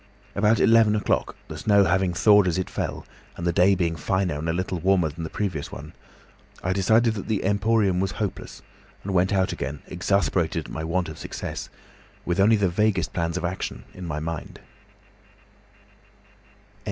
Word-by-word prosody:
About 105 +2 +3
eleven 115 -2 +5
o'clock, 105 - 0
the - - -7
snow 100 -2 +4
having 95 0 +2
thawed 105 +2 +5
as 85 - 0
it 95 - -3
fell, - - -4 0.3
and 85 - -5
the 85 - +1
day 95 +3 +4
being 85 -3 0
finer 90 -3 -1
and 80 +2 -3
a - - +2
little 90 +1 -2
warmer 90 -2 +2
than 80 +3 -7
the 80 - -4
previous 90 -8 -3
one, 75 +4 -9 0.7
I 95 - 0
decided 110 +4 +3
that 100 - -6
the 110 -3 -1
Emporium 100 -1 +2
was 95 +1 -1
hopeless, 105 -4 -5 0.4
and 100 - -4
went 90 +1 +2
out 95 -2 +1
again, 70 +2 -5
exasperated 90 -2 0
at - - -10
my 80 - -4
want 85 +2 -1
of 80 -1 -9
success, - - -6 0.6
with 85 +1 -1
only 105 +3 +5
the 100 -2 +2
vaguest 105 +4 0
plans 85 0 -1
of 90 - -3
action 90 +2 -4
in 90 -1 -8
my 75 -2 -3
mind." 80 0 -6
95 Hz, 175 wpm, -24 LUFS, 85-100 Hz, 0.7 s, eleven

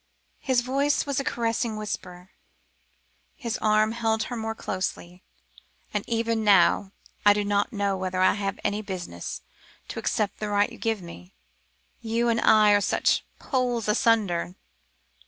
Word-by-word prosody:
His 260 -3 +1
voice 275 +3 +1
was 280 -2 -1
a - - -1
caressing 230 -2 -1
whisper, 185 -3 -6 1.0
his 235 -6 -4
arm 215 0 +3
held 225 -1 0
her 245 - -5
more 225 -1 -3
closely. 180 -3 -4 0.7
"And 210 -1 -1
even 230 -1 0
now, 195 -1 +4 0.3
I 205 - +7
do 205 0 -1
not 205 +3 +1
know 200 -3 0
whether 185 -1 -3
I 185 - +5
have 195 -1 -3
any 205 +1 -1
business 180 - -6 0.5
to - - -5
accept 210 -2 -1
the 210 - -3
right 205 0 +2
you - - -12
give 225 -4 -1
me? 180 +2 -12 0.7
You 235 +1 0
and 230 0 +1
I 215 -1 +6
are 205 0 +4
such 200 - +1
poles 245 -4 -1
asunder." 210 -6 +1
215 Hz, 150 wpm, -26 LUFS, 195-230 Hz, 1.0 s, I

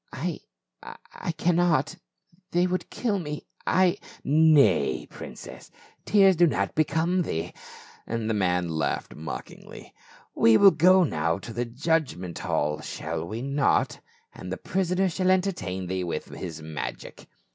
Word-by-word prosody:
" - - -40
I 160 +5 -4 0.3
— - - -54 0.3
I - - -4
cannot. 165 -3 +1 0.5
They 175 +1 +2
would 185 0 -2
kill 210 -5 -1
me 150 -3 -6
— - - -30 0.2
I 185 +2 +2
— - - -15
" - - -22
"Nay, 145 - +4
princess, - - -10 0.4
tears 195 -2 +5
do 175 +1 +5
not 100 -9 -1
become 160 +4 +1
thee;" 85 - -3 0.5
and 115 -1 -2
the 110 - 0
man 90 -3 +1
laughed 80 -1 -2
mockingly. 80 - -9 0.2
" - - -28
We 115 -1 +7
will 195 - +8
go 185 +4 +5
now 85 - 0
to 115 +4 -9
the 120 +1 -2
judgment 125 - -2
hall, 75 0 -1
shall 80 +1 -5
we 110 +6 -5
not? 140 +1 +1 0.3
And - - -8
the - - -3
prisoner 185 0 0
shall 185 +1 0
entertain 180 - 0
thee 95 +1 -2
with 85 -3 -4
his 80 -4 -7
magic." 80 -2 -7
145 Hz, 155 wpm, -26 LUFS, -, 0.5 s, will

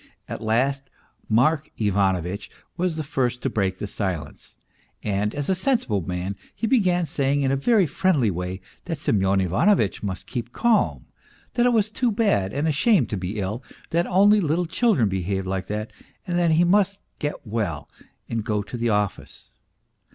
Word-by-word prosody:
At - - -6
last 135 +5 0 0.4
Mark 145 +7 +2
Ivano 100 -3 +2
vitch 95 +4 -5 0.3
was 180 -1 -1
the 155 - -3
first 125 -4 -1
to - - 0
break 95 -3 0
silence, 90 -8 -5 0.5
and 105 0 -1
as 145 -1 -3
a 190 - +3
sensible 185 - +1
man 90 +3 -3 0.2
he - - -2
began 185 -8 +2
saying 140 -1 0
in 135 - +2
a - - +2
very 200 - +3
friendly 145 - +2
way 90 +1 -4 0.2
that 165 -3 -3
Semyon 95 -7 +2
Ivanovitch 100 - +2
must 95 -4 -4
keep 120 -1 -5
calm, 230 - +1 0.5
that 245 0 +3
it 245 - +3
was 215 -2 +2
too 245 +1 +1
bad 200 - +1
and 145 +6 -1
a - - +3
shame 165 - +3
to 105 - -4
be 95 +3 -4
ill, 105 +4 -3 0.3
that 170 +1 +1
only 205 +3 +5
little 170 +2 +1
children 170 - +2
behaved 95 0 -2
like 95 0 -3
that, 105 +1 -4 0.3
that 175 -1 +2
he 160 +2 +4
must 200 +2 +2 0.2
get 145 -3 -4
well 100 -10 -3 0.4
and 115 -2 -2
go 105 -1 -1
to 120 - -7
the 120 0 0
office. 105 -2 -2
125 Hz, 175 wpm, -24 LUFS, -, 0.5 s, only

